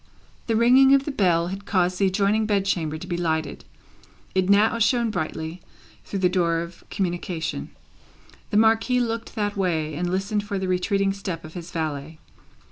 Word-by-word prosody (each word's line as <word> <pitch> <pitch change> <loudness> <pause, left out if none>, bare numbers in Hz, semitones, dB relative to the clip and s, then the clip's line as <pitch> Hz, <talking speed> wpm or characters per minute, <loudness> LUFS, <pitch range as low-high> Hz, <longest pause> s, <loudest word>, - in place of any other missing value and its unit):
The 225 - +1
ringing 260 +4 +6
of 275 0 +1
the 295 - -2
bell 175 -8 +2
had 195 +1 -6
caused 180 -2 +1
the 195 - +4
adjoining 205 +3 +1
bed 200 -2 +1
chamber 160 -5 -1
to - - -8
be 175 - -3
lighted. 160 -3 -2 0.7
It 190 0 +1
now 215 +3 +4
shone 235 0 +2
brightly, 160 -1 -4 0.4
through 195 - -4
the - - +7
door 170 -2 +1
of 170 +1 -9
communication. 175 -3 -3 0.8
The 205 - +1
Marquis 225 +3 +3
looked 230 -1 -3
that 205 -2 -1
way, 165 -5 -1
and 175 +4 -2
listened 200 +3 -1
for 205 -1 -3
the 190 0 -2
retreating 195 +2 +1
step 185 -5 -5
of 155 - -11
his 175 -1 -7
valet. 155 -1 -4
190 Hz, 175 wpm, -24 LUFS, 170-215 Hz, 0.8 s, the